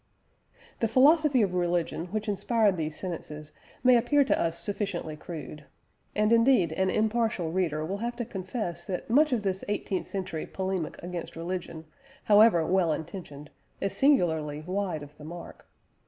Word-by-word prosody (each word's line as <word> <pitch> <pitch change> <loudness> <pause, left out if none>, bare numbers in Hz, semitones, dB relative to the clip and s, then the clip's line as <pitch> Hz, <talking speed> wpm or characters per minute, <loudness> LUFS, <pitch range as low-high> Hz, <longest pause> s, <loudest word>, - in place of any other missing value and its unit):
The 230 - +2
philosophy 275 +2 +5
of 190 -3 -1
religion 175 -1 -1
which 215 +4 -3
inspired 210 0 +2
these 155 -2 -4
sentences 155 -4 -6 0.3
may 250 -1 +7
appear 265 +5 +4
to 270 - +1
us 165 0 0
sufficiently 175 -3 -3
crude. 150 -2 -8 0.5
And 210 +2 +3
indeed 230 - +4
an 190 +3 +1
impartial 220 -5 0
reader 160 -4 0
will 195 +5 -3
have 240 +2 -3
to 240 -1 -3
confess 190 -4 -4
that 185 +3 -4
much 300 +4 +5
of 235 -4 0
this 190 -1 -2
eighteenth 205 -2 -2
century 185 -5 -4
polemic 190 -4 -3
against 175 -1 -6
religion, 170 -1 -5 0.4
however 210 -6 +6
well 180 -2 +2
intentioned, 155 -3 -6 0.3
is 195 - -2
singularly 160 - +2
wide 180 -2 -3
of 145 +1 -14
the - - -11
mark. 170 +3 -10
185 Hz, 155 wpm, -28 LUFS, 165-220 Hz, 0.5 s, may